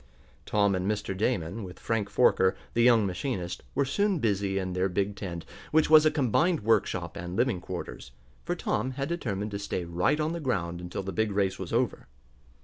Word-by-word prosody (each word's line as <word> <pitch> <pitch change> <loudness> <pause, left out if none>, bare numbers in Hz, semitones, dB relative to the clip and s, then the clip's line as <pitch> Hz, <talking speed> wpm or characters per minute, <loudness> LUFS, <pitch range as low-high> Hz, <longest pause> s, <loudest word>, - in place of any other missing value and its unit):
Tom 100 -1 +3
and 95 +1 -1
Mr. 105 -2 -2
Damon, 100 -1 -1
with 90 -1 -9
Frank 110 -3 -1
Forker, 95 -6 +4 0.2
the 120 - +2
young 115 -3 +5
machinist, 90 -2 -3
were - - +2
soon 200 +8 +1
busy 100 -6 0
in 95 -1 -2
their 90 +1 +1
big 100 +2 -1
tent, 90 -5 -6 0.3
which 155 0 +3
was 155 0 +8
a - - +6
combined 155 - +2
workshop 100 -5 +1
and 90 -2 -5
living 120 -5 +1
quarters, 65 - -7 0.3
for 175 +1 -2
Tom 130 -6 -1
had 135 +1 -3
determined 105 - -3
to 100 - -3
stay 95 -3 -3
right 85 - +1
on 155 +2 0
the 170 - -3
ground 90 - -2
until 90 +2 -5
the 95 0 -5
big 110 +3 0
race 95 -1 0
was 95 -2 -6
over. 120 +1 0
100 Hz, 195 wpm, -28 LUFS, 95-130 Hz, 0.3 s, was